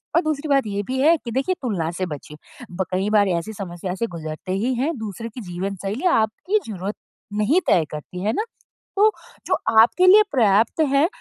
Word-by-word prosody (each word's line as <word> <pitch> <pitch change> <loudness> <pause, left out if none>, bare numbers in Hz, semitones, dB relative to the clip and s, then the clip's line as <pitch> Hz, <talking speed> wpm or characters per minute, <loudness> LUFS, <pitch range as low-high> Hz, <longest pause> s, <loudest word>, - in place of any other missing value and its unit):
और 340 - +5
दूसरी 310 -2 -2
बात 275 -4 +3
ये 200 0 -2
भी 260 +1 -2
है 320 +4 +6
कि 240 -6 -8
देखिए 270 +10 0
तुलना 190 -10 -1
से 185 - 0
बचे। 150 -2 -8 0.4
ब 185 +2 -2
कई 190 +3 0
बार 210 -1 +4
ऐसी 175 +5 -2
समस्या 180 -2 -5
से 230 +4 -2
गुज़रते 160 0 -7
ही 225 +7 0
हैं, 280 +7 -1
दूसरे 220 +1 -6
की 240 +3 -9
जीवन 190 +1 -4
शैली 215 - -3
आपकी 225 - +1
ज़रूरत 200 0 -4 0.4
नहीं 215 - +3
तय 165 -3 +4
करती 165 +4 -7
है 215 +2 +1
ना? 425 - 0 0.5
तो 430 +2 +5 0.4
जो - - +1 0.3
आपके 360 +11 +4
लिए 415 +3 +8
पर्याप्त 225 +2 +3
है 280 +4 +4
215 Hz, 200 wpm, -22 LUFS, 185-275 Hz, 0.5 s, लिए